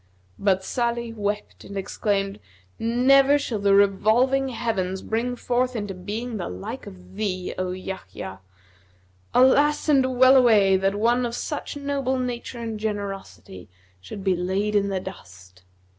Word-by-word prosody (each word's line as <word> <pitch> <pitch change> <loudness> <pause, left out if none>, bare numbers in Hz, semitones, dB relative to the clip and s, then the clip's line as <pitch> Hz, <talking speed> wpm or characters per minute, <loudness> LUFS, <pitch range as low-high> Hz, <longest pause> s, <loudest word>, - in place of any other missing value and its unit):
But 190 -2 +2
Salih 235 0 -2
wept 210 -1 -4
and 200 - -8
exclaimed, 195 0 -2 0.4
'Never 270 +5 +4
shall 250 -7 -3
the 200 0 +4
revolving 225 +7 +3
heavens 190 -6 -2
bring 240 +3 -1
forth 250 +1 -1
into 205 -3 -3
being 215 +6 -5
the 180 - -4
like 150 - -7
of 185 -2 -13
thee, 190 -3 -3
O 185 0 -1
Yahya! 140 - -7 1.0
Alas, 290 +5 +4
and 260 -3 +3
well 260 +1 +7
away, 210 -6 +5
that 195 +1 +1
one 235 +4 +2
of 235 -1 -2
such 295 +1 -4
noble 280 -2 -1
nature 245 -1 -4
and 225 -2 -5
generosity 200 - -6 0.3
should 95 - -9
be 190 -2 +2
laid 190 +4 -1
in 200 -1 +2
the 190 -1 -1
dust!' 90 - -12
210 Hz, 145 wpm, -24 LUFS, 190-245 Hz, 1.0 s, well